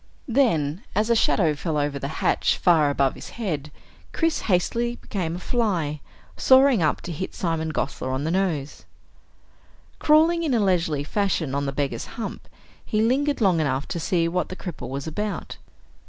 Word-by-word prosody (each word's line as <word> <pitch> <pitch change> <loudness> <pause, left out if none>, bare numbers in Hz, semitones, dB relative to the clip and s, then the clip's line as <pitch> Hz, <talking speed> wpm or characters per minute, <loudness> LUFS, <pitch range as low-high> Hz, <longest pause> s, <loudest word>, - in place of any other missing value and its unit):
Then, 195 - +1
as 215 +3 +2
a - - +5
shadow 170 -7 +3
fell 150 +1 -3
over 145 -1 -1
the 140 - -3 0.2
hatch - - +2
far 160 -5 +4
above 140 -1 +1
his - - -10
head, 155 -10 -3 0.4
Chris 330 -1 +1
hastily 235 +6 +1
became 175 -8 -4
a - - -6
fly, 180 - -1 0.3
soaring 260 -4 +5
up 155 - +1
to 175 - -6
hit 180 +4 -5
Simon 165 -2 -1
Gosler 135 -3 -3
on 130 +2 -2
the 160 - -1
nose. 170 -7 -1 1.1
Crawling 320 +3 +4
in 300 -7 +1
a - - +3
leisurely 170 -7 +1
fashion 170 -4 -1
on 140 0 -1
the - - -1
beggar's 140 0 -2
hump, 230 - -6 0.4
he 215 - -1
lingered 280 +4 +1
long 185 -5 +3
enough 140 -2 -1
to 170 - -3
see 165 +1 +1
what 180 +2 -1
the 185 - -6
cripple 180 -8 -7
was 135 +1 -4
about. 205 +6 -4
175 Hz, 170 wpm, -24 LUFS, 150-220 Hz, 1.1 s, a